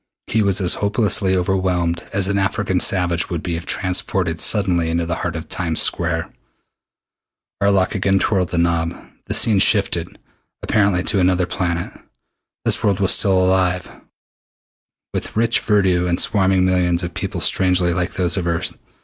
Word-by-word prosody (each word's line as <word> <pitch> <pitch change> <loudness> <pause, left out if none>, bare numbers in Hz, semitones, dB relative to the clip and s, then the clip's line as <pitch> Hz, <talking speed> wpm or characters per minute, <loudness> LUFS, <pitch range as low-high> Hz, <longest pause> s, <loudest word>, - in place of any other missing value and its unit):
He 110 - 0
was 100 -1 +1
as 90 - +3
hopelessly 100 -2 +1
overwhelmed 90 -2 -1
as 100 -2 +1
an 100 0 0
African 95 -1 -1
savage 90 -3 +1
would 85 -3 -4
be 85 -2 -3
if 85 +2 -7
transported 90 -2 -1
suddenly 90 -5 +2
into 85 +1 -1
the 85 0 -3
heart 85 -2 -4
of 80 +1 -6
Times 85 -3 -2
Square. - - 0 1.3
Arlok 100 -2 +2
again 95 -1 +1
twirled 95 -3 0
the 90 - -3
knob. 85 0 0 0.3
The - - -2
scene 105 -4 +3
shifted, 95 -4 +1 0.5
apparently 100 -4 +1
to 100 - +1
another 90 0 +2
planet. 85 -1 -3 0.7
This - - +1
world 100 -2 +1
was 95 -2 +2
still 95 -2 +3
alive, 90 -1 0 1.2
with - - -5
rich 115 +1 +2
verdure 95 -4 +1
and 85 0 0
swarming 95 -3 +2
millions 90 -1 +1
of 85 0 -5
people - - -4
strangely 90 -2 +2
like 90 +1 -2
those 90 -2 0
of 90 -2 -2
Earth. 85 0 -2
90 Hz, 160 wpm, -19 LUFS, 85-95 Hz, 1.3 s, as